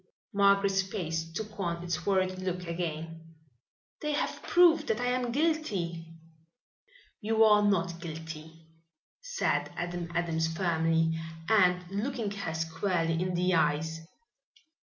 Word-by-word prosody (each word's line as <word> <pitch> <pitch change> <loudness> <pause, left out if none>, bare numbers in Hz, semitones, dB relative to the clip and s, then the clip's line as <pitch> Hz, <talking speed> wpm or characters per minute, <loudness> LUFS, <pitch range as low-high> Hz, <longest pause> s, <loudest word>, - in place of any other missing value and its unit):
Margaret's 200 -1 +4
face 165 -4 -3
took 215 +4 -6
on 170 -2 -2
its 170 -1 -3
worried 185 -1 +1
look 180 -1 -3
again. 165 -1 -5 0.7
"They 300 0 -1
have 290 - -2
proved 330 -4 +5
that 220 - 0
I 245 - -1
am 250 -1 -1
guilty." 220 - -1 1.1
"You 225 0 +3
are 210 -1 +6
not 175 -4 +1
guilty," 160 -1 -8 0.6
said - - -1
Adam 175 -1 -4
Adams 165 -1 0
firmly 165 -1 +1 0.3
and 180 -4 +4
looking 220 +1 -2
her 200 -5 -4
squarely 165 +1 0
in 185 -1 -1
the 180 +1 +2
eyes. 160 0 +1
180 Hz, 120 wpm, -30 LUFS, 165-205 Hz, 1.1 s, are